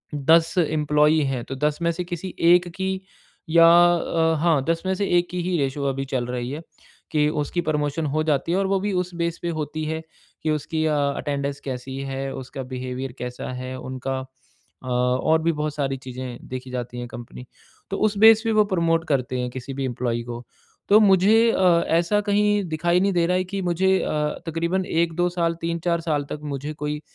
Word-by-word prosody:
10 160 +4 +3
employee 150 -1 +3
हैं 120 -2 -3
तो 135 - -6
10 150 +2 -1
में 170 - +2
से 180 - -3
किसी 175 +1 -6 0.2
1 180 0 +3
की 190 0 -1 0.6
या 165 +1 +7 0.3
अ, 165 -1 +1
हाँ 160 -4 +2
10 165 0 0
में 190 - +1
से 200 +2 -1
एक 175 - +1
की 180 - -2
ही 180 -1 0
रेशियो 140 -1 -1
अभी 135 0 -1
चल 130 -3 -2
रही 125 0 -3
है 145 - -4 0.5
कि 150 -1 +3
उसकी 150 +3 -2
प्रमोशन 150 0 -1
हो 155 +2 0
जाती 155 +1 0
है - - +2
और 195 - +1
वो 195 0 +1
भी 205 +2 -2
उस 180 0 -7
बेस 170 0 -2
पे 170 - -2
होती 155 +1 -3
है 160 +1 -2 0.4
कि 155 - +1
उसकी 155 +1 -1
अ, 155 -1 +2
अटेंडेंस 140 0 -1
कैसी 130 0 -6
है? 135 0 -4
उसका 130 0 -7
बिहेवियर 130 0 -5
कैसा 125 +1 -5
है 130 +1 -5
उनका? 130 +1 -4 0.6
अ, 130 - -9
और 125 +6 +2
भी 165 - +3
बहुत 150 -1 -3
सारी 135 -2 -1
चीजें 130 -1 -8
देखी 130 0 -6
जाती 120 -1 -5
है 120 - -5
कंपनी। 120 +1 -10 0.5
तो 195 - -1
उस 205 -1 -4
बेस 220 +1 +7
पे 225 - +2
वो 215 -1 +4
प्रमोट 165 -1 +1
करते 130 -3 0
हैं 125 0 -2
किसी 130 +2 -7
भी 135 0 -3
एम्प्लॉई 120 -2 -2
को। 120 0 -7 0.5
तो 210 +2 +7
मुझे 200 +1 +5
अ, 175 -4 +3
ऐसा 170 +6 +2
कहीं 205 0 +2
दिखाई 170 +3 +1
नहीं 195 0 +2
दे 170 -1 +2
रहा 180 +1 +2
है 185 - +1
कि 195 - -1
मुझे 190 +2 +2
अ, - - -2 0.4
तकरीबन 170 +3 -1
1-2 170 +1 +1
साल, 170 -1 0
3-4 170 0 -1
साल 150 -3 -1
तक 150 - -4 0.2
मुझे 145 +3 -5
कोई 150 0 -4
155 Hz, 205 wpm, -23 LUFS, 135-175 Hz, 0.6 s, या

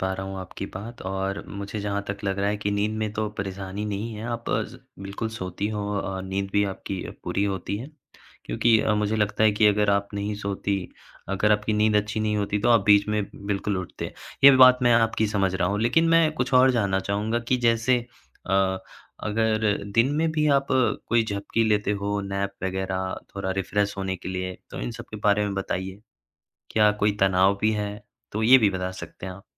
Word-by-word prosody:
पा 95 0 0
रहा 95 0 -5
हूँ 95 0 -6
आपकी 95 -1 -7
बात 115 +5 -8
और 95 0 -2
मुझे 100 +1 -6
जहाँ 100 0 -2
तक 100 0 -3
लग 95 0 -1
रहा 100 +1 +1
है 105 - 0
कि 105 0 -2
नींद 105 +1 0
में 110 -1 -2
तो 110 0 -2
परेशानी 100 +1 -4
नहीं 105 +3 -3
है। 105 +2 -7
आप 115 0 -4
अज 110 +2 -1 0.3
बिल्कुल 100 +3 -4
सोती 95 +2 -3
हो 105 -1 -3
औ 100 - 0 0.2
अ, - - -4
नींद 95 +1 -3
भी 100 0 +3
आपकी 95 -1 -5
अ, - - -7
पूरी 100 - 0
होती 100 0 -2
है। 120 +6 -7 0.6
क्योंकि 115 -2 +3
अ, 110 - +1
मुझे 105 +1 0
लगता 105 +1 +1
है 110 - +5
कि 105 +1 +3
अगर 105 0 +3
आप 100 0 +1
नहीं 100 +1 -2
सोतीं, 100 -2 -2 0.5
अगर 105 +2 +3
आपकी 105 +1 0
नींद 105 0 +3
अच्छी 105 +1 0
नहीं 105 -1 0
होती 105 0 0
तो 120 - +1
आप 115 -1 +6
बीच 100 -1 +5
में 105 -1 +1 0.2
बिल्कुल 100 0 -1
उठते। 90 - -6 0.3
ये 140 - +12
भी 130 - +5
बात 130 -1 +8
मैं 120 -1 +5
आपकी 115 -1 +2
समझ 95 -3 0
रहा 90 -1 +1
हूँ, 105 +1 -1
लेकिन 165 +9 +3
मैं 165 -1 +5
कुछ 125 -1 -2
और 130 +1 +7
जानना 100 -6 +1
चाहूँगा 105 +4 -1
कि 130 - +3
जैसे 115 +2 +3 0.5
अ, 95 -1 +2 0.5
अगर 110 0 +1 0.3
दिन 115 +4 +4
में 160 0 +1
भी 150 -1 +1
आप 135 0 0
कोई 120 -2 +1
झपकी 105 +2 -1
लेते 105 -1 +1
हो 100 0 -1
नैप 100 0 -2
वगैरह 95 0 -2 0.2
थोड़ा 100 -1 -3
रिफ्रेश 100 +2 -1
होने 95 -1 -2
के 90 - -8
लिए 95 0 -4
तो - - -6
इन - - -3
सबके - - -9
बारे 105 0 +3
में 100 -1 -2
बताइए। 95 0 -4 0.7
क्या 105 -1 +4
कोई 105 0 +1
तनाव 95 +1 +3
भी 110 0 +3
है? 105 -1 -2 0.4
तो 110 - -2
ये 130 +4 +8
भी 110 -5 +3
बता 95 -1 -3
सकते 90 -1 -9
हैं 95 - -5
आप। 95 +2 -13
105 Hz, 215 wpm, -25 LUFS, 95-110 Hz, 0.7 s, ये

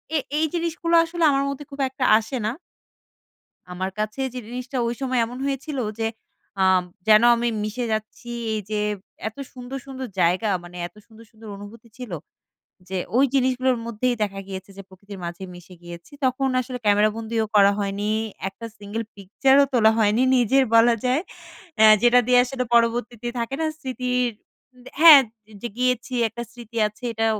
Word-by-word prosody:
এ - - +4 0.2
এই 315 - +2
জিনিসগুলো 335 0 -1
আসলে 335 0 -3
আমার 275 0 +1
মধ্যে 280 +1 -6
খুব 280 - -10
একটা 260 -1 -3
আসে 225 +4 -4
না 220 - 0 1.2
আমার 185 +1 -3
কাছে 215 +5 -3
যে 250 - -5
জিনিসটা 250 +2 -6
ওই 235 - -1
সময় 255 -2 0
এমন 245 +2 -8
হয়েছিল 275 0 -3 0.2
যে, 225 - +1 0.6
আম 185 -1 +4 0.2
যেন 215 +1 +7
আমি 235 0 0
মিশে 220 +3 -3
যাচ্ছি 215 +2 -6 0.2
এই 215 - -1
যে 210 -1 -1 0.5
এত 220 - -8 0.2
সুন্দর, 255 +1 -7
সুন্দর 265 -1 -6
জায়গা, 185 +6 +2
মানে 175 0 -12
এত - - -26
সুন্দর, 225 0 -16
সুন্দর 220 0 -14
অনুভূতি 220 +3 -12
ছিল। 250 -6 -8 0.8
যে, 190 -1 -3 0.2
ওই 270 - +5
জিনিসগুলোর 255 -1 +2
মধ্যেই 240 +2 -1
দেখা 195 -1 -2
গিয়েছে 190 0 -7
যে, 195 - -8
প্রকৃতির 195 +1 -12
মাঝে 170 +2 -6
মিশে 180 +1 -13
গিয়েছি। 175 +6 -11
তখন 260 +1 +1
আসলে 250 0 -6
ক্যামেরা 210 +1 +4
বন্দিও 225 0 -2
করা 200 0 +6
হয়নি, 200 +1 -2 0.4
একটা 230 +4 -10
সিঙ্গল 210 +3 -5
পিকচারও 265 +8 +3
তোলা 220 -3 +5
হয়নি 215 +3 +3
নিজের 265 +3 +3
বলা 230 +1 +6
যায়। 260 +6 +1 0.6
অ্যা 220 0 +8
যেটা 245 +1 +6
দিয়ে 250 0 +5
আসলে 255 0 -3
পরবর্তীতে 235 0 +1
থাকে 235 +3 -3
না? 320 - +1
স্মৃতির 250 -2 -1 0.7
হ্যাঁ, 315 -4 +11 0.4
যে 240 - -4
গিয়েছি 250 0 0
একটা 235 +2 -7
স্মৃতি 235 -1 -12
আছে, 215 +4 -16
এটা 225 0 0
235 Hz, 165 wpm, -23 LUFS, 210-255 Hz, 1.2 s, হ্যাঁ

